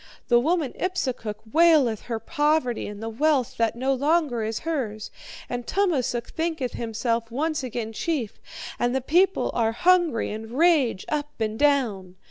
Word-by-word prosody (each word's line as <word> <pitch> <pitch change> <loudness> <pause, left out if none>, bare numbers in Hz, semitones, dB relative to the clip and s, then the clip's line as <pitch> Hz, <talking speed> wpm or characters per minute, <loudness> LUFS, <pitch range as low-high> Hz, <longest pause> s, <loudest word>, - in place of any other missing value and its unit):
The 240 -1 +6
woman 310 0 0
Ipsukuk 260 - -2 0.2
waileth 310 -9 +4
her 230 -2 -2
poverty 295 0 0
and 205 +1 -8
the - - -3
wealth 270 +1 +1
that 230 -1 +1
no 260 +3 0
longer 285 -2 +1
is 220 0 -3
hers. 245 -10 -3 0.4
And 245 -1 -5
Tummasook 280 -12 0
thinketh 320 -6 -2
himself 230 0 -2
once 305 +6 -1
again 235 -3 -4
chief, 255 -4 -3 0.4
and 245 +1 +1
the 265 - +1
people 355 +8 +2
are 225 -1 +1
hungry 345 -2 +2
and 220 +3 -7
rage 300 - +3
up 295 -3 -3
and 220 0 -2
down.' 230 -11 +1
255 Hz, 150 wpm, -25 LUFS, 225-310 Hz, 0.4 s, The